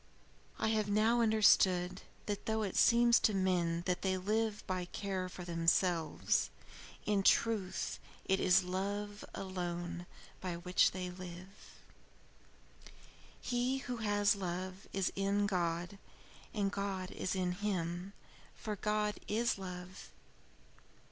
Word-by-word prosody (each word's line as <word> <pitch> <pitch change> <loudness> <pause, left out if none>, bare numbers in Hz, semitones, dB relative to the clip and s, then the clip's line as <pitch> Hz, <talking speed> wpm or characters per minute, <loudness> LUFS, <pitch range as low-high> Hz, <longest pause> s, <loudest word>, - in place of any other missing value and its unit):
"I - - +1
have 215 -2 +1
now 220 +3 +3
understood 185 -5 +4 0.2
that 205 -1 -4
though 220 0 +1
it 195 - -3
seems 235 0 +6
to 215 - +2
men 175 -3 +1
that 180 -1 0
they 190 -1 +1
live 215 +3 -1
by 185 -1 -2
care 185 0 -3
for 180 - -8
themselves, 170 0 +1 0.6
in 205 -2 +2
truth 195 -2 +2 0.3
it 190 0 +2
is 185 0 +5
love 200 +3 -3
alone 175 -2 -4 0.3
by 180 -2 -3
which 180 +2 +3
they 180 -1 -5
live. 180 +2 -10 1.6
He 250 +2 0
who 245 -1 -3
has 205 -2 +2
love, 185 +1 -4
is 195 -1 0
in 200 +1 +1
God, 175 0 -1 0.5
and 200 -2 0
God 195 -2 -3
is 185 - -2
in 180 -1 0
him, 180 -1 -2 0.4
for 215 -2 -4
God 210 +1 0
is 230 0 +1
love." 180 - -8
190 Hz, 120 wpm, -34 LUFS, 180-210 Hz, 1.6 s, seems